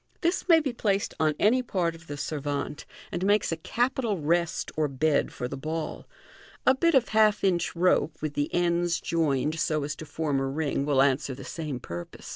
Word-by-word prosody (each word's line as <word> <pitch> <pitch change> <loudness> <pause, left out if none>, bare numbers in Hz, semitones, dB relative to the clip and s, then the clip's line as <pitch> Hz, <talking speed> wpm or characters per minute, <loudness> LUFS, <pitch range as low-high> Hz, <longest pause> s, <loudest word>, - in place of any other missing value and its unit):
This 350 +2 0
may 330 -1 +8
be 280 -5 -2
placed 205 -3 0
on 155 -1 +2
any 240 +5 +4
part 180 -8 -1
of 165 0 -14
the 145 - -6
servante, 145 0 -3 0.3
and 175 - -3
makes 205 0 +2
a - - 0
capital 235 +4 -1
rest 170 +3 0
or 155 0 +1
bed 140 +2 +1
for 125 - -4
the 140 - -5
ball. 155 +3 -4 0.6
A 260 - +6
bit 335 +4 +2
of 255 -3 +3
half 215 -1 +3
inch 180 -3 +1
rope, 170 -2 +2
with 155 -1 -3
the 145 0 -1
ends 175 -1 +1
joined 155 -2 0
so 155 -1 0
as 145 +1 -3
to 155 - -8
form 150 -4 -1
a 135 - -1
ring, 140 0 -1
will 135 -2 +4
answer 135 -1 +1
the - - -10
sama 150 -5 -4
purpose. 85 -7 -8
160 Hz, 200 wpm, -27 LUFS, 145-195 Hz, 0.6 s, may